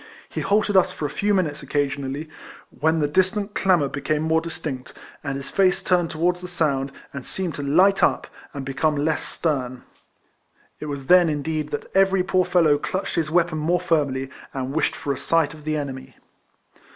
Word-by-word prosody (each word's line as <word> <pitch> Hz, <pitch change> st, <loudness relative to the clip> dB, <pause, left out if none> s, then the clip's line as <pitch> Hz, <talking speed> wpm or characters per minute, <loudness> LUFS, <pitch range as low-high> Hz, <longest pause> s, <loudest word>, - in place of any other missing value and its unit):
He -, -, -4 dB
halted 205 Hz, 0 st, +1 dB
us 185 Hz, -, +5 dB
for 150 Hz, -, -5 dB
a 145 Hz, -, -2 dB
few 205 Hz, +6 st, 0 dB
minutes 165 Hz, -7 st, 0 dB
occasionally, 140 Hz, +1 st, -2 dB, 0.4 s
when 160 Hz, +2 st, +1 dB
the 145 Hz, -, +2 dB
distant 190 Hz, +6 st, 0 dB
clamour 180 Hz, -7 st, +3 dB
be 140 Hz, +1 st, -5 dB
came 155 Hz, +1 st, 0 dB
more 160 Hz, 0 st, +2 dB
distinct, 150 Hz, -6 st, -6 dB, 0.3 s
and 145 Hz, -2 st, -3 dB
his 140 Hz, 0 st, -8 dB
face 190 Hz, -2 st, +2 dB
turned 175 Hz, -2 st, +2 dB
towards 175 Hz, +3 st, 0 dB
the 180 Hz, -, -6 dB
sound, 140 Hz, -6 st, 0 dB, 0.2 s
and 140 Hz, -2 st, -6 dB
seemed 180 Hz, +3 st, -3 dB
to 145 Hz, -, -5 dB
light 180 Hz, +8 st, +4 dB
up, -, -, +2 dB, 0.3 s
and 140 Hz, -2 st, -6 dB
become 150 Hz, +3 st, 0 dB
less 150 Hz, +2 st, 0 dB
stern. 130 Hz, -6 st, -2 dB, 1.0 s
It 150 Hz, -, -6 dB
was 140 Hz, -2 st, -5 dB
then 180 Hz, +1 st, +6 dB
indeed 155 Hz, 0 st, -2 dB
that -, -, -4 dB
every 195 Hz, -1 st, +4 dB
poor 185 Hz, 0 st, +2 dB
fellow 155 Hz, -5 st, +3 dB
clutched 190 Hz, +5 st, -3 dB
his 160 Hz, -2 st, 0 dB
weapon 170 Hz, -1 st, +1 dB
more 170 Hz, +4 st, +1 dB
firmly, 140 Hz, -6 st, 0 dB, 0.2 s
and 130 Hz, 0 st, -3 dB
wished 160 Hz, 0 st, +1 dB
for 145 Hz, -3 st, -2 dB
a -, -, -6 dB
sight 165 Hz, -2 st, +1 dB
of 155 Hz, -2 st, -14 dB
the 155 Hz, 0 st, 0 dB
enemy. 130 Hz, -3 st, -6 dB
155 Hz, 190 wpm, -23 LUFS, 140-180 Hz, 1.0 s, then